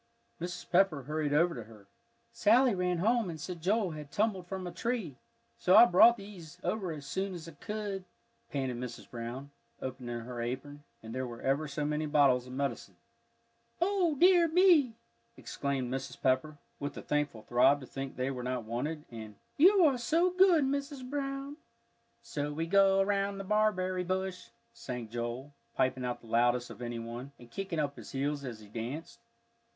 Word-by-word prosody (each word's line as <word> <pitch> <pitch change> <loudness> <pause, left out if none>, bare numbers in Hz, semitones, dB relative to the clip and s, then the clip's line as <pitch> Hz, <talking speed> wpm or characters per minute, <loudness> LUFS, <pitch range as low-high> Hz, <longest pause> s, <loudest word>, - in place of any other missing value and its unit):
Mrs. 180 +1 -5
Pepper 175 -6 +3
hurried 150 +1 -2
over 170 +4 +3
to 120 -4 -7
her. 110 -3 -15 0.5
"Sally 240 +3 +4
ran 180 -1 0
home 225 +2 +2
and 160 -2 -6
said 175 +1 -6
Joel 195 +1 +1
had 150 -2 -8
tumbled 200 -4 0
from 190 -1 -5
a 175 - -4
tree, 220 - -3 0.4
so 185 - +4
I - - +11
brought 235 +5 +7
these 180 -5 -11
over 185 -1 -1
as 150 -3 -7
soon's 185 +1 -4
I - - -8
could," 200 +3 -5 0.4
panted 130 -3 -2
Mrs. 120 -1 -7
Brown, 125 +4 -7 0.3
opening 125 -2 -5
her 120 0 -6
apron, 135 +5 -5 0.2
and 110 0 -8
there 130 0 -2
were 120 -1 -9
ever 140 +3 +1
so 145 +1 -3
many 150 +1 -1
bottles 140 -4 +3
of 125 - -9
medicine. 140 +1 -3 0.8
"O 350 -3 +2
dear 350 +2 +6
me!" 325 - +5 0.4
exclaimed 135 -3 -3
Mrs. 135 - -5
Pepper, 135 +3 +1 0.2
with 145 0 -4
a - - -7
thankful 145 -7 -1
throb 125 +5 +4
to - - -8
think 135 +1 -6
they 130 +1 -1
were 125 -2 -5
not 125 -1 -2
wanted, 145 +8 -4
and, 110 -2 -8 0.2
"You 375 +5 +6
are 270 -5 +3
so 335 +9 +2
good, 365 -4 +5
Mrs. 280 -1 -3
Brown." 275 +1 -4 0.7
"So 150 -11 -3
we 160 +3 -2
go 195 +2 +4
round 200 0 0
the - - -4
barberry 185 -3 +1
bush," 185 0 -3 0.3
sang 125 - -6
Joel, 120 +4 -5 0.2
piping 130 0 +1
out 125 -1 -3
the 115 - -15
loudest 120 +2 +2
of - - -11
any 120 -1 -4
one, 120 +4 -7
and 120 -1 -15
kicking 195 0 -4
up 145 -2 -1
his - - -10
heels 140 +1 -1
as 120 -5 -6
he 105 - -13
danced. 120 +9 -6
155 Hz, 175 wpm, -31 LUFS, 130-200 Hz, 0.8 s, I